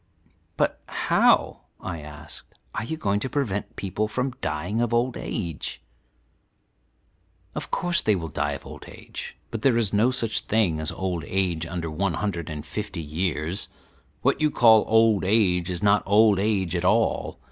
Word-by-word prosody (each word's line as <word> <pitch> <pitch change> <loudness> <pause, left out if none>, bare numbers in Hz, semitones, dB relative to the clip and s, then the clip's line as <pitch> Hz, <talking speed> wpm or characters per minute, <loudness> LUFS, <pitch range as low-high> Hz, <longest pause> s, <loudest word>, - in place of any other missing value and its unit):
"But - - 0
how," - - +3 0.2
I 85 -3 -5
asked, 75 0 -11 0.2
"are - - -2
you 160 +8 -4
going 100 -8 0
to 130 - -3
prevent 115 -9 -2
people 100 +2 -2
from 125 +4 -2
dying 80 +9 -1
of 120 -1 +1
old 120 +1 +1
age?" 85 -8 -4 1.7
"Of - - -5
course 175 -1 +1
they 105 - +3
will 85 -3 -3
die - - -1
of - - -8
old - - -10
age; - - -9
but 115 - -4
there 125 -2 +4
is 110 -4 +1
no 110 +4 +4
such 120 -4 0
thing 100 -8 +1
as 80 +1 -2
old 90 -4 -3
age 90 -4 0
under 85 -2 -4
one 90 +2 -1
hundred 85 -6 -3
and 75 -1 -6
fifty 105 +1 -5
years; 80 +2 -2 0.6
what - - +2
you 155 - +4
call 110 -5 +6
old 110 -2 +4
age 95 -3 +2
is 90 +2 -4
not 105 0 +4
old 105 0 +5
age 95 -4 0
at 85 - -1
all. 110 +5 +1
100 Hz, 170 wpm, -25 LUFS, 85-110 Hz, 1.7 s, call